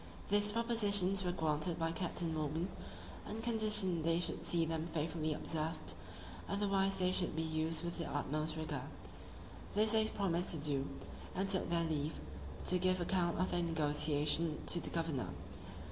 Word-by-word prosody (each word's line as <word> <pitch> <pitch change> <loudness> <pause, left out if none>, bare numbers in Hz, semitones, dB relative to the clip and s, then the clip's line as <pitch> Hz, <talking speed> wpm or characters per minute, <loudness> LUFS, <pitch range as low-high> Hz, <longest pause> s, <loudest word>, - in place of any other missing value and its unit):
These 205 +1 +5
propositions 205 -5 +2
were 180 - 0
granted 160 0 0
by 165 -1 -1
Captain 170 -1 -2
Morgan, 155 +3 -2 0.6
on 220 - -5
condition 215 -6 +3
they 165 +1 +2
should 175 - +2
see 170 -1 +3
them 160 0 -2
faithfully 160 -1 -2
observed; 155 - -1 0.6
otherwise 195 -1 +1
they 185 -1 +3
should 180 -3 -1
be 160 - 0
used 160 +1 -1
with 170 0 -4
the 165 - -3
utmost 155 +2 -2
rigour: 145 -4 -4 0.9
this 215 +1 +5
they 220 -1 +4
promised 180 -5 0
to 165 - +2
do, 140 -2 -1 0.5
and 195 +1 0
took 195 -1 +1
their 170 0 +1
leave, 155 0 -2 0.5
to 180 - +5
give 185 0 +2
account 175 -1 0
of 185 - 0
their 175 - +1
negotiation 155 0 +1
to 175 - +4
the - - -6
governor. 160 - -2
170 Hz, 160 wpm, -36 LUFS, 155-190 Hz, 0.9 s, These